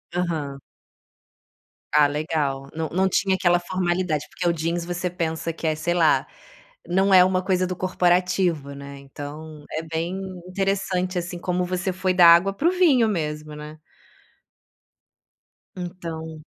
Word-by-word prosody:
Aham. 155 -6 -2 1.3
Ah, 145 -1 +6
legal, 145 -2 -2
não 160 -1 -2
não 190 +2 +1
tinha 190 +1 +2
aquela 175 -1 +3
formalidade, 175 -4 -1
porque 175 - -3
o - - +4
jeans 170 +1 -2
você 175 +1 -2
pensa 165 -1 -3
que 165 - -8
é, 155 - +2
sei 170 +3 -1
lá, 160 -6 +3 0.6
não 190 +2 +2
é 180 -1 +9
uma 185 0 +1
coisa 185 -1 +1
do 185 - -3
corporativo, 180 -4 +1
né, 140 0 -9
então, 145 +2 -9
é 160 - -3
bem 165 +4 -3 0.3
interessante 185 -1 -1
assim 175 +1 -5
como 180 +1 -1
você 185 +1 -2
foi 185 0 0
da 180 -1 +6
água 170 +4 +6
para 290 +12 0
o - - +4
vinho, 300 -11 +4
mesmo, 150 -5 -3
né. 150 +1 -9 2.0
Então 165 -3 -7
175 Hz, 145 wpm, -23 LUFS, 155-185 Hz, 2.0 s, é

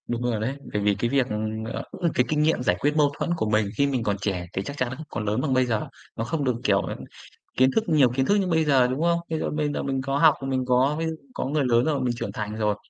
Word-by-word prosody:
Đúng 120 0 -2
rồi 120 -3 0
đấy, 120 +6 -2 0.2
bởi 105 - 0
vì, 100 0 +2
cái 120 - 0
việc, 135 -1 +2 0.5
ờ, - - -4 0.3
cái, 125 - +2
kinh 150 -1 +1
nghiệm 155 -4 +2
giải 90 - +2
quyết 145 +1 +1
mâu 145 -2 +4
thuẫn - - -2
của 110 - -1
mình 110 -1 +2
khi 140 - +3
mình 130 -4 -1
còn 100 -2 0
trẻ 95 -3 -2
thì 95 - -1
chắc 140 +8 -7
chắn 125 -2 0
không 155 - -9
có 115 - -4
lớn 105 +3 -1
bằng 140 -2 0
bây 130 0 +3
giờ. 115 -3 -1 0.3
Nó 115 - -2
không 145 +5 -2
được, 125 -3 +1
kiểu, 100 -1 +3
ừm, - - -5 0.6
kiến 130 +1 +5
thức 225 - +3
nhiều 145 -6 +5
kiến 130 0 +2
thức 205 - +3
như 195 -2 +1
bây 160 -2 +2
giờ, 135 -4 +4
đúng 130 +4 -2
không? 170 0 +2
Ví 160 - -1
dụ - - -2
bây 150 -1 -1
giờ - - -2
mình 135 -1 -1
có 135 +1 -1
học, 155 -1 +6
mình 130 -1 -1
có 130 +3 +3
ví 165 - -1
dụ 160 0 -2 0.2
có - - -3
người 145 +2 0
lớn 120 -1 +3
rồi 145 -4 0
mình 125 -2 0
trưởng - - -4
thành 105 0 -4
rồi, 105 -2 0
130 Hz, 300 wpm, -25 LUFS, 115-150 Hz, 0.6 s, học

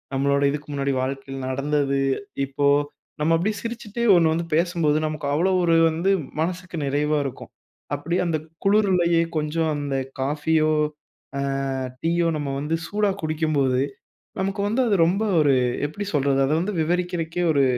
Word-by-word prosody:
நம்மளோட 140 +1 +2
இதுக்கு 150 +1 -5
முன்னாடி 140 -1 0
வாழ்க்கையில 135 +1 -4
நடந்தது, 140 +1 0 0.5
இப்போ 140 +1 0 0.5
நம்ம 160 +2 +3
அப்பிடியே 205 +6 0
சிரிச்சிட்டே 230 -1 -5
1 165 -2 +4
வந்து 170 +1 -2
பேசும்போது 165 -3 +2
நமக்கு 155 -1 -5
அவ்ளோ 170 +6 +2
ஒரு 170 -1 +3 0.2
வந்து 170 +5 0 0.3
மனசுக்கு 180 +2 -3
நிறைவா 150 +2 +1
இருக்கும். 135 - -7 0.4
அப்பிடியே 165 +5 -1
அந்த 165 -2 0 0.3
குளுருலயே 185 -5 +3 0.2
கொஞ்சம் 155 +1 0
அந்த 145 -1 -3 0.3
காஃபியோ! 155 +3 +1 0.7
அ - - 0 0.6
டீயோ! 170 +1 +2
நம்ம 145 -2 -3
வந்து 150 +3 -1
சூடா 205 0 +1
குடிக்கும்போது, 150 -5 +1 0.6
நமக்கு 195 +1 -1
வந்து 225 +5 +1
அது 210 - +3
ரொம்ப 190 +6 +1 0.2
ஒரு 145 -2 +4 0.3
எப்பிடி 200 +8 -6
சொல்றது? 140 -1 +2
அத - - -1
வந்து 205 +4 -2
விவரிக்கிறக்கே 175 0 -1
ஒரு 140 -2 +3
160 Hz, 140 wpm, -23 LUFS, 145-175 Hz, 0.7 s, 1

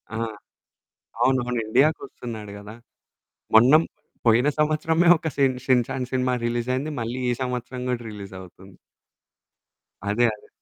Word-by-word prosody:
ఆ! - - -2 1.1
అవునవును. 125 -2 +1
ఇండియాకొస్తున్నాడు 120 -4 -1
కదా! 105 +1 -10 0.8
మొన్న 120 +5 +7 0.5
పోయిన 120 +4 +4
సంవత్సరమే 155 +3 +2
ఒక 160 - -3
షిన్ 135 -2 +2
'షిన్ 125 -2 +3
చాన్' 125 -1 -3
సినిమా 130 0 +1
రిలీజయింది. 125 +5 -1
మళ్ళీ 120 +2 -3
ఈ - - +2
సంవత్సరం 125 0 -4
కూడా 125 -1 -1
రిలీజవుతుంది. 95 -2 -11 1.3
అదే, 115 +4 +3
అదే. 105 - -15
125 Hz, 115 wpm, -24 LUFS, 110-130 Hz, 1.3 s, మొన్న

